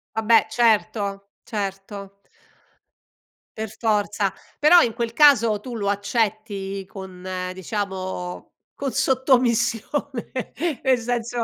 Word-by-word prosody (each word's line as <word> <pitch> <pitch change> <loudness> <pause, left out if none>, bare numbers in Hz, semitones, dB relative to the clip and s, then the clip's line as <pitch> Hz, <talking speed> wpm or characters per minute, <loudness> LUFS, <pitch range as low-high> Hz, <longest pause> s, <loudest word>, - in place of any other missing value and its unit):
Vabbè 220 +1 +4
certo. 210 -3 +1
Certo. 200 -1 -5 1.5
Per 220 0 -3
forza. 210 -3 0 0.2
Però 325 +4 +7
in 230 - +1
quel 235 -1 -2
caso 235 -7 +5
tu 250 -2 -7
lo 205 -3 -2
accetti 205 -2 -2
con 185 -2 -10 0.3
diciamo, 185 -2 -4 0.2
con 275 -1 -3
sottomissione, 255 0 +1 0.5
nel 260 -2 +4
senso 240 0 -2
220 Hz, 95 wpm, -23 LUFS, 200-240 Hz, 1.5 s, Però